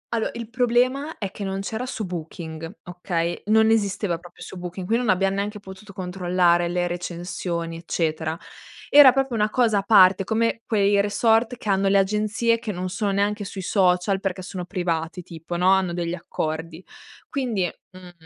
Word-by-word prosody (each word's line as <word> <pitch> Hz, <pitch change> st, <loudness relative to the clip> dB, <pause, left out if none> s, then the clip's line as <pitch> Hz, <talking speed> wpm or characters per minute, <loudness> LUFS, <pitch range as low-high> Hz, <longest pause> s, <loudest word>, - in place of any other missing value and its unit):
Allo 225 Hz, -, 0 dB
il 235 Hz, -1 st, -6 dB
problema 250 Hz, +5 st, +1 dB
è 200 Hz, -3 st, -4 dB
che 205 Hz, -, -7 dB
non 195 Hz, 0 st, -3 dB
c'era 220 Hz, +5 st, -4 dB
su 225 Hz, -5 st, -4 dB
Booking, 165 Hz, -1 st, -7 dB
okay? 175 Hz, -2 st, -3 dB
Non 220 Hz, +1 st, +4 dB
esisteva 200 Hz, -5 st, 0 dB
proprio 175 Hz, 0 st, -13 dB
su -, -, -9 dB
Booking, 180 Hz, +1 st, -6 dB
quindi 230 Hz, +5 st, +1 dB
non 245 Hz, -, -1 dB
abbiamo 195 Hz, +1 st, +2 dB
neanche 210 Hz, +1 st, -3 dB
potuto 195 Hz, +1 st, -12 dB
controllare 180 Hz, -2 st, +1 dB
le 175 Hz, 0 st, 0 dB
recensioni 175 Hz, -1 st, -4 dB
eccetera. 160 Hz, -1 st, -2 dB, 0.5 s
Era 285 Hz, -2 st, +9 dB
proprio 270 Hz, 0 st, -1 dB
una 210 Hz, 0 st, +1 dB
cosa 225 Hz, -3 st, +2 dB
a -, -, -1 dB
parte, 195 Hz, -2 st, +6 dB
come 230 Hz, +3 st, 0 dB
quei 205 Hz, -3 st, +3 dB
resort 225 Hz, +4 st, +2 dB
che 220 Hz, -, -11 dB
hanno 195 Hz, 0 st, +2 dB
le 195 Hz, +1 st, +4 dB
agenzie, 215 Hz, +4 st, +1 dB
che 230 Hz, -2 st, -4 dB
non 185 Hz, -1 st, -4 dB
sono 200 Hz, +2 st, -1 dB
neanche 205 Hz, +1 st, 0 dB
sui 190 Hz, -1 st, -6 dB
social, 185 Hz, 0 st, +2 dB
perché 190 Hz, -1 st, -3 dB
sono 180 Hz, -1 st, -6 dB
privati 175 Hz, 0 st, -3 dB
tipo, 165 Hz, +1 st, -7 dB
no, 180 Hz, +2 st, +3 dB
hanno 190 Hz, -2 st, +2 dB
degli 170 Hz, 0 st, -2 dB
accordi. 160 Hz, 0 st, -5 dB, 0.4 s
Quindi, 240 Hz, -9 st, -1 dB, 0.3 s
mhmm, 185 Hz, -1 st, -12 dB
195 Hz, 175 wpm, -23 LUFS, 175-215 Hz, 0.5 s, Era